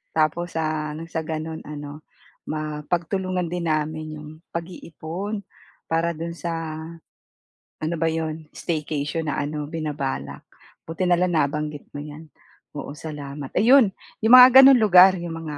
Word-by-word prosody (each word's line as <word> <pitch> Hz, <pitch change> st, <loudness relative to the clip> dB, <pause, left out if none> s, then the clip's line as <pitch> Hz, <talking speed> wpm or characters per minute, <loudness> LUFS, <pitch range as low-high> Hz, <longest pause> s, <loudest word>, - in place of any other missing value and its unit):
tapos 160 Hz, +2 st, 0 dB
sa 155 Hz, -1 st, -2 dB
ano 160 Hz, -, -7 dB
gano'n 160 Hz, -1 st, -4 dB
ano 145 Hz, 0 st, -8 dB, 0.5 s
mapagtulungan 170 Hz, +4 st, -2 dB
din 175 Hz, 0 st, -3 dB
namin 155 Hz, 0 st, -1 dB
'yong 150 Hz, 0 st, -10 dB, 0.2 s
pag-iipon, 170 Hz, +4 st, -6 dB, 0.5 s
para 165 Hz, +1 st, +1 dB
do'n 165 Hz, +1 st, -5 dB
sa 170 Hz, 0 st, -3 dB, 1.3 s
ano 160 Hz, +2 st, -1 dB
ba 165 Hz, +1 st, +1 dB
'yon 160 Hz, -1 st, -4 dB
staycation 155 Hz, 0 st, -3 dB
na -, -, -2 dB
ano 150 Hz, +1 st, -4 dB
binabalak 150 Hz, -3 st, -4 dB, 0.4 s
buti 165 Hz, +3 st, -2 dB
na 175 Hz, -, +4 dB
lang 180 Hz, 0 st, +1 dB
nabanggit 150 Hz, -1 st, -1 dB
mo 145 Hz, -, -5 dB
'yan, 150 Hz, +2 st, -10 dB, 0.5 s
oo 140 Hz, -, -6 dB
salamat. 145 Hz, -2 st, -7 dB
Ayun 235 Hz, +2 st, +6 dB, 0.3 s
'yong 220 Hz, +2 st, +4 dB
mga 250 Hz, 0 st, +11 dB
gano'n 270 Hz, -1 st, +8 dB
lugar 190 Hz, -3 st, +7 dB
'yong 170 Hz, -1 st, -5 dB
mga 160 Hz, -2 st, -6 dB
160 Hz, 135 wpm, -23 LUFS, 150-175 Hz, 1.3 s, mga